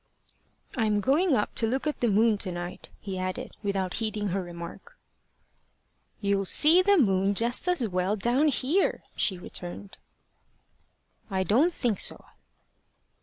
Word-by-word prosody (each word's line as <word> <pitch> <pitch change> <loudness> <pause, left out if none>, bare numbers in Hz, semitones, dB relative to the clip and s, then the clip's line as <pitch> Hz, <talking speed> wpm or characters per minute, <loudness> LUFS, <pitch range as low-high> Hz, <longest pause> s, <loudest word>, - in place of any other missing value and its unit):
"I'm 215 -4 +1
going 285 - +2
up 210 - -1
to 225 - 0
look 260 +5 -2
at 300 - -2
the 240 - +1
moon 215 0 +3
to 190 - -3
night," 175 0 -7
he 190 -2 -5
added, 185 0 -4
without 195 -3 -2
heeding 215 -2 -2
her 190 +2 -1
remark. 175 - -10 1.2
"You'll 200 -1 0
see 315 - +5
the 400 +1 +4
moon 195 - +2
just 235 - +1
as 355 -10 +1
well 185 +1 0
down 240 +8 +1
here," 295 +7 +1
she 190 - 0
returned. 180 +2 -8 1.3
"I 190 -2 0
don't 260 - +3
think 240 - -1
so." - - +1
210 Hz, 140 wpm, -27 LUFS, 190-265 Hz, 1.3 s, see